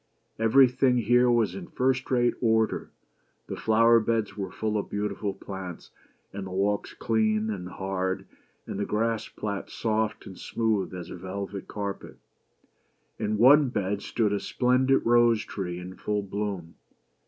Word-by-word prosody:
Everything 125 +2 +4
here 120 +2 +4
was 120 -2 +2
in 180 -3 -7
first 130 -2 0
rate 120 -2 +3
order. 110 -2 +1 0.6
The - - -5
flower 115 +1 +4
beds 110 -1 -1
were 95 -2 -4
full 110 +3 -3
of - - -5
beautiful 100 0 -2
plants, 95 -3 -8 0.4
and 95 -1 -5
the - - -7
walks 100 +2 -1
clean 110 -1 +1
and 90 -3 -5
hard, 95 0 -3 0.4
and 100 - -5
the 100 - 0
grass 115 +1 -1
plats 100 -2 -5
soft 110 -1 -1
and 95 - -10
smooth 110 -5 -1
as 90 -2 -7
a - - -6
velvet 95 +2 -6
carpet. 100 -1 -5 1.0
In 105 0 -1
one 135 +5 +7
bed 100 -3 -2
stood 105 -3 0
a 100 - 0
splendid 130 +4 +2
rose 120 -2 +4
tree 90 -3 -4
in 90 +1 -7
full 105 +1 -2
bloom. 100 -4 -4
105 Hz, 150 wpm, -27 LUFS, 100-115 Hz, 1.0 s, one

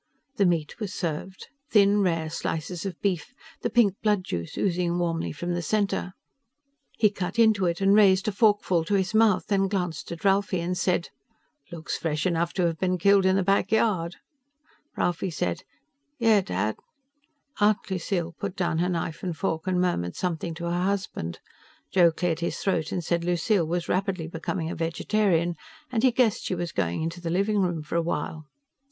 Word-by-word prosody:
The 200 - +4
meat 165 0 -1
was 210 -4 -4
served 180 +2 -4 0.2
thin, 205 -1 +4
rare 165 -4 0
slices 165 +4 -3
of 180 -3 -7
beef, 195 +4 -2 0.3
the - - 0
pink 225 -4 +4
blood 210 -3 +2
juice 85 - -5
oozing 175 -2 0
warmly 165 -2 -1
from 175 +4 -3
the 175 - -1
center. 195 0 -1 0.8
He 210 -2 +4
cut 185 -1 -4
into 220 -5 +4
it 170 +2 -2
and 195 0 +5
raised 195 -2 +5
a - - +2
forkful 205 -5 +2
to 205 - +1
his 190 +1 0
mouth, 220 -3 +4
then 195 -1 +1
glanced 180 -6 -3
at 170 +2 -7
Ralphie 195 -1 +2
and 175 +2 -2
said, 180 -1 0 0.6
"Looks 170 -1 -4
fresh 155 -2 -1
enough 170 -1 +1
to 180 - +1
have 165 -2 -1
been 185 -1 +1
killed 195 +2 +4
in 190 - +3
the 195 - +2
back 195 +1 +1
yard." 190 -7 +1 0.8
Ralphie 175 +2 0
said, 90 - -2 0.6
"Yeah, 225 -4 +4
Dad." 105 - -2 0.8
Aunt 210 -1 +2
Lucille 175 -2 -2
put 200 -2 -4
down 170 -3 0
her 180 +1 +1
knife 165 -2 -3
and 175 -4 -4
fork 160 -1 -2
and 185 -1 +1
murmured 90 - 0
something 170 -2 -3
to 170 - -8
her 175 +1 -1
husband. 185 - -2 0.5
Joe 175 -3 +5
cleared 165 -1 -1
his 170 - -2
throat 165 -5 -1
and 175 - -2
said 170 +1 0
Lucille 175 +1 +1
was 170 +1 -2
rapidly 185 -3 -1
becoming 165 0 -3
a - - -4
vegetarian 170 +1 +1 0.4
and 230 -3 +1
he 260 - +5
guessed 235 -3 +2
she 185 - -1
was 175 -1 -3
going 90 - -1
into 165 +2 -4
the 170 - -3
living 200 +4 +1
room 175 -4 -1
for 155 +2 -3
a - - +3
while. 155 -1 -3
180 Hz, 185 wpm, -26 LUFS, 165-195 Hz, 0.8 s, and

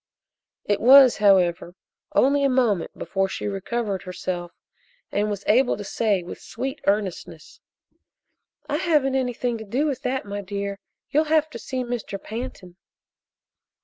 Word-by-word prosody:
It 205 -1 0
was, 260 +1 +8
however, 185 -3 +3 0.4
only 280 +2 +4
a 275 - +3
moment 240 -9 +1
before 195 0 -1
she - - -5
recovered 200 0 -3
herself 180 -1 -5 0.6
and 210 +1 0
was 200 -1 -4
able 245 +4 +3
to 205 - -6
say 200 -2 0
with 175 - -9
sweet 270 +2 -5
earnestness: 190 -5 -2 1.1
"I 295 - -1
haven't 300 -6 +2
anything 245 -2 -1
to - - -6
do 245 +8 -1
with 275 -4 -2
that, 260 -2 -2
my 205 0 -5
dear. 200 0 -4 0.3
You'll 305 +2 +3
have 310 0 +2
to - - -7
see 260 -2 -4
Mr. 240 -5 -4
Pantin." 210 -6 -7
215 Hz, 145 wpm, -24 LUFS, 195-260 Hz, 1.1 s, was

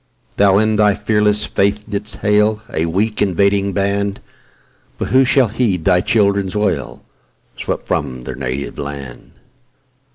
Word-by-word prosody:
Thou 100 -1 +4
in 110 0 +2
thy 105 -1 +4
fearless 105 0 +1
faith 100 +2 0
didst 105 -1 -4
hail 105 +1 +2
A 80 +1 0
weak, 105 +6 -1
invading 100 +1 +2
band, 100 +1 -1 0.8
But - - -3
who 130 +1 +5
shall 130 -2 +3
heed 100 -7 -1
thy 90 0 +4
children's 100 -3 +1
wail, 90 - -2 0.5
Swept - - -4
from 65 -1 -3
their - - -6
native 65 +3 -5
land? 70 -3 -7
100 Hz, 135 wpm, -17 LUFS, 90-105 Hz, 0.8 s, who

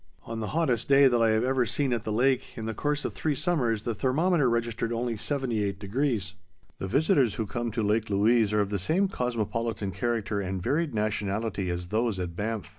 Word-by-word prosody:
On 115 0 -5
the 110 - -3
hottest 130 -10 +1
day 140 0 +7
that 120 -2 +2
I 115 - +4
have 110 +1 +2
ever 130 0 +2
seen 130 +3 0
at 115 -1 -2
the 110 - -2
lake 130 +4 +1
in 110 - -4
the 115 - -2
course 145 +5 -1
of - - -2
three 155 -2 -1
summers 125 - 0
the 120 - -1
thermometer 145 - +2
registered 115 -1 -1
only 120 +1 -1
78°. 110 -3 -1 0.5
The 95 - -3
visitors 140 - +2
who 110 - -2
come 120 +2 -3
to 115 0 -2
Lake 105 +1 +1
Louise 105 +2 +3
are 105 0 +3
of 100 0 -2
the 100 - -1
same 170 - +2
cosmopolitan 115 - -2
character 105 +1 -1
and 95 0 -3
varied 145 - -1
nationality 105 -2 -1
as 85 0 -4
those 110 -2 0
at 85 -2 -4
Banff. 110 +1 -3
115 Hz, 200 wpm, -27 LUFS, 105-130 Hz, 0.5 s, day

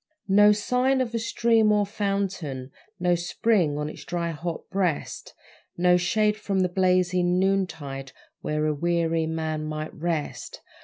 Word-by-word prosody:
No 205 +1 +6
sign 250 +5 +1
of 245 -3 -1
a 230 - 0
stream 225 -1 +2
or 210 -1 +3
fountain, 195 -10 -3 0.3
No 180 0 +2
spring 175 -2 +1
on 150 0 -2
its 155 - -9
dry, 170 -1 -2
hot 165 +1 -5
breast, 185 -6 -2 0.4
No 180 0 +4
shade 210 +4 +1
from 200 -2 -1
the 180 - +1
blazing 180 -1 +2
noontide 160 -9 -1 0.3
Where 150 0 -1
a 155 - +1
weary 165 +1 0
man 160 -1 -2
might 155 0 -5
rest. 160 -2 -4
180 Hz, 145 wpm, -25 LUFS, 160-200 Hz, 0.4 s, No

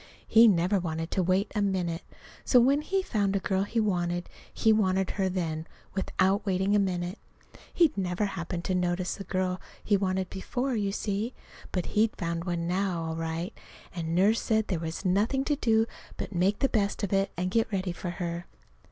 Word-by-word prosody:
He 230 +1 +7
never 190 0 +3
wanted 165 -1 -3
to 190 - +1
wait 185 +3 +1
a 210 - 0
minute. 180 -4 0 0.4
So 250 - +5
when 275 +4 +4
he 380 +5 0
found 200 - 0
a - - +2
girl 190 0 0
he 230 +3 -1
wanted, 175 -4 0 0.2
he 220 -1 +3
wanted 190 -3 +2
her 195 - -1
right 185 - -1
then, 160 -3 -2 0.3
without 190 +1 +1
waiting 195 +1 +1
a - - +5
minute. 180 0 -1 0.5
He'd 335 -5 +3
never 185 +1 0
happened 175 -2 -4
to 185 - -1
notice 180 +1 0
a - - -4
girl 185 -1 -1 0.2
he 205 - +3
wanted 190 -1 0
before, 245 +7 -2
you 200 -2 0
see. 210 +4 -2 0.4
But 180 -2 -1
he'd 220 +1 +3
found 170 -1 -3
one 170 -2 -1
now, 180 -2 0
all 160 0 -3
right; 165 +4 -3 0.4
and 165 -1 -2
Nurse 205 +5 +4
said 220 -1 +1
there 180 -5 0
was 165 +3 -5
nothing 210 +9 +2
to 295 - +2
do 225 -4 +3 0.3
but - - -5
to - - -8
make 190 +4 +2
the 270 - +3
best 205 -3 0
of 200 - -1
it, 195 0 +2
and 180 +1 -1
get 225 +1 +1
ready 190 -2 -1
for 175 +1 -5
her. 175 0 -4
190 Hz, 200 wpm, -28 LUFS, 175-210 Hz, 0.5 s, He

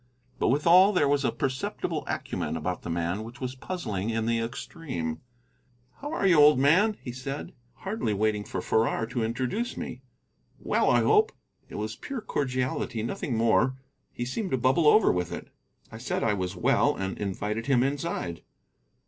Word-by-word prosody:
But - - +2
withal 175 +9 +5
there 145 -6 +3
was 140 0 +2
a - - +2
perceptible 130 -1 -2
acumen 80 - -3
about 90 +3 -3
the - - -7
man 85 +5 -1
which 115 +4 -10
was 130 -1 -3
puzzling 115 - -4
in 115 -1 -1
the 115 0 +1
extreme. 115 - -4 0.8
"How 290 +2 -6
are 320 - -1
you, 175 -5 +6
old 150 -1 +7
man?" 185 +11 +4 0.2
said 135 +3 -5
he, - - -23 0.3
hardly 195 - -2
waiting 105 0 0
for 95 -2 -5
Farrar 115 0 +1
to 115 0 -2
introduce 130 - -2
me. 125 - -6 0.6
"Well, - - +1
I - - +4
hope." 435 +2 +4 0.4
It - - -9
was - - -3
pure 270 -4 -6
cordiality, 130 - -2
nothing 120 +1 -3
more. 115 +3 +3 0.4
He 120 - -4
seemed 190 - -3
to 130 - +1
bubble 130 +6 +3
over 215 +9 +6
with 90 -1 -2
it. - - -7 0.4
I 110 - -9
said 120 - -2
I 110 - +2
was 95 -1 -3
well, 90 - +2
and 95 0 -3
invited 105 +3 -3
him 130 -3 +4
inside. 135 - -2
125 Hz, 175 wpm, -27 LUFS, 105-150 Hz, 0.8 s, old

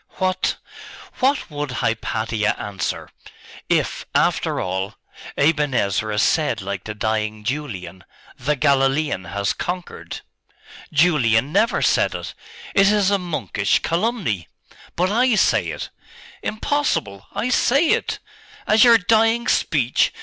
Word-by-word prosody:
'What 185 0 0 0.6
what 265 - +1
would 145 -1 -4
Hypatia 110 -2 -1
answer 100 -2 -4 0.6
if, - - 0
after - - +1
all, 95 +2 -3 0.4
Aben 150 -2 +2
Ezra 105 +1 0
said - - +2
like 100 0 -5
the 105 - -5
dying 110 0 -2
Julian, 110 -9 -5 0.3
"The 150 +5 -1
Galilean 135 -5 +1
has 100 +3 -1
conquered"?' 180 0 -6 0.7
'Julian 145 -6 +3
never 230 +2 +2
said - - +2
it! - - -6 0.4
It 195 0 +5
is 205 -2 +2
a 200 - +2
monkish 120 - 0
calumny.' 170 - -1 0.5
'But 180 +2 +1
I 245 +2 +3
say - - +2
it.' - - -5 0.5
'Impossible!' 215 - -2
'I 245 - -1
say 275 +5 +3
it!' - - +1 0.5
'As 215 0 +5
your 235 -2 +8
dying 225 +4 +2
speech? 130 - +2
145 Hz, 120 wpm, -21 LUFS, -, 0.7 s, your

